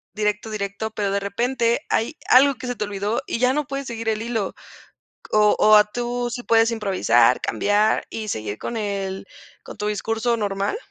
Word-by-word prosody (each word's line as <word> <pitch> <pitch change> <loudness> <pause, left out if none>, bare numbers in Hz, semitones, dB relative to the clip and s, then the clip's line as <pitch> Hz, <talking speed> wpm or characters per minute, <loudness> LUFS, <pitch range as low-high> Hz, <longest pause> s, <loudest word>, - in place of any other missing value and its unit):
directo 210 +1 -1
directo. 210 +1 -4
Pero 205 -2 -2
de 200 - +1
repente, 235 +5 0
hay 235 +8 0
algo 275 +2 +6
que 250 - -8
se 245 - -3
te 215 - -3
olvidó, 205 +2 -2
y - - -2
ya 250 +1 +3
no 300 +1 -1
puedes 275 0 -4
seguir 230 -1 -3
el 215 -1 -1
hilo. 225 -4 -2 0.8
O 210 -1 +4
o 215 0 +7
a 210 - +8
tú 240 +2 -3
¿Si 245 +1 -5
puedes 225 0 +3
improvisar, 180 - +2
cambiar 205 +1 +1
y 220 -1 -5
seguir 105 - -4
con 235 - -5
el 195 -2 -4 0.4
con - - -11
tu 210 0 -3
discurso 225 +3 -1
normal? 200 - -2
215 Hz, 185 wpm, -22 LUFS, 200-235 Hz, 0.8 s, a